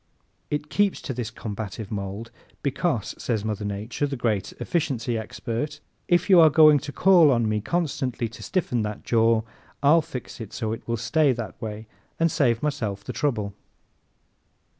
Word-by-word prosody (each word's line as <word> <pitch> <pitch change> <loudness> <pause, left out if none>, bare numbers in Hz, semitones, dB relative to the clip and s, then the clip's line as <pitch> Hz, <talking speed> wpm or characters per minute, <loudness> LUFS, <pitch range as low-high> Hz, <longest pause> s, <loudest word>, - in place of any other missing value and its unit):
It 150 0 -3
keeps 205 -1 +2
to 135 - -3
this 120 -3 -3
combative 110 -2 -6
mold, 100 +2 -5 0.3
"because," 140 - -1
says 110 -4 -1
Mother 105 -1 -2
Nature, 105 +8 -2
the 140 - -3
great 110 -6 -1
efficiency 125 -8 -1
expert, 115 +7 -4 0.3
"if 175 -1 +3
you 185 -3 +7
are 160 -1 +8
going 155 -1 +7
to 145 +2 -7
call 175 -2 +6
on 120 -4 +2
me 105 0 0
constantly 130 -5 -1
to 110 0 -12
stiffen 125 -10 -1
that 105 -1 -4
jaw 115 -1 +3 0.4
I'll 155 +4 +6
fix 135 -6 -8
it 110 - -8
so 110 -1 -2
it 115 - -8
will 115 0 0
stay 135 +5 +2
that 115 -4 -7
way 110 0 -5 0.3
and 165 0 +3
save 120 -5 +2
myself 110 -10 -2
the 125 - -6
trouble." 110 -4 -1
120 Hz, 165 wpm, -25 LUFS, 110-150 Hz, 0.4 s, are